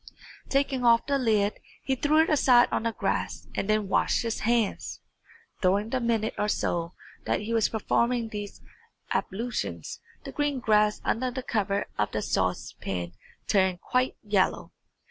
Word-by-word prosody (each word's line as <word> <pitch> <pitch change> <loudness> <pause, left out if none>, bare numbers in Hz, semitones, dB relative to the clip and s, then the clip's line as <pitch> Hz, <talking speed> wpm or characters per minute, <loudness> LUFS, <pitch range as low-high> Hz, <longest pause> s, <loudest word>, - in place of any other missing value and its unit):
Taking 275 -2 +1
off 235 -1 +5
the 280 -1 +1
lid, 215 -4 +1 0.2
he 270 - 0
threw 300 +4 +3
it - - -3
aside 250 -5 +5
on - - 0
the 230 0 0
grass - - -2
and 195 - -3
then 215 -1 +2
washed 195 - +2
his 230 -1 -2
hands. 230 -2 0 0.6
During 200 +4 +2
the 260 - +1
minute 230 -2 0
or 210 - +1
so 170 -4 -1 0.3
that - - 0
he 220 +2 -3
was 225 -2 +3
performing 235 +1 0
these 205 -1 -7 0.5
ablutions, 235 +5 -3 0.2
the - - -7
green 290 -2 -1
grass 210 -3 +2
under 255 +3 0
the 255 +1 -5
cover 200 -4 0
of - - 0
the - - -1
saucepan 90 -2 -2 0.3
turned 190 -3 +2
quite 255 0 0
yellow. 205 -3 +1
225 Hz, 155 wpm, -27 LUFS, 205-250 Hz, 0.6 s, off